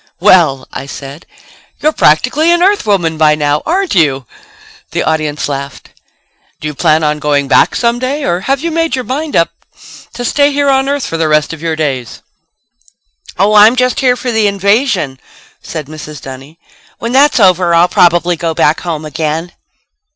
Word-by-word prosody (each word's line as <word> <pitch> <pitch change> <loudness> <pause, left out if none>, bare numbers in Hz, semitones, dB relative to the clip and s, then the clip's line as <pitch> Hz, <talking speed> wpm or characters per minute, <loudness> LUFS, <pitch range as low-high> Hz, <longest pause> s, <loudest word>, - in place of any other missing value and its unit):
"Well," 170 -9 +3
I 135 - -6
said, 140 +3 -10 0.5
"you're 305 - +1
practically 260 - +2
an 345 0 +2
Earthwoman 200 - +1
by 155 -1 +4
now, 150 0 0
aren't 375 +2 0
you?" 140 -8 +1 0.7
The - - -1
audience 155 -2 -2
laughed. 140 -1 -7 0.7
"Do 155 - -5
you 150 - -5
plan 155 +2 +1
on 150 0 0
going 145 -1 0
back - - +3
someday 255 +5 -1
or 175 -5 0
have 270 +7 -1
you 335 +1 -2
made 330 0 -1
up - - +3
your 255 - -4
mind 285 +6 -4
to 235 +7 -5
stay 285 +3 +2
here 285 0 0
on 270 0 +1
Earth 285 -1 -1
for 165 - -4
the 160 -1 0
rest 155 +1 +1
of 160 - -10
your 165 -1 -2
days?" 135 -6 -4 1.1
"Oh, 200 +3 +2
I'm 215 +3 +6
just 250 0 0
here 250 -2 +2
for 250 0 -4
the 220 -2 +1
invasion," 200 - 0 0.4
said 155 -3 -6
Mrs. 150 0 -9
Dunny. 135 +4 -11 0.4
"When 230 - -4
that's 280 +1 +3
over 180 -3 +3
I'll 170 +1 +4
probably 175 0 +2
go 165 0 -3
back 150 +1 +2
home 160 -3 -5
again." 160 +2 -3
175 Hz, 175 wpm, -12 LUFS, 150-255 Hz, 1.1 s, I'm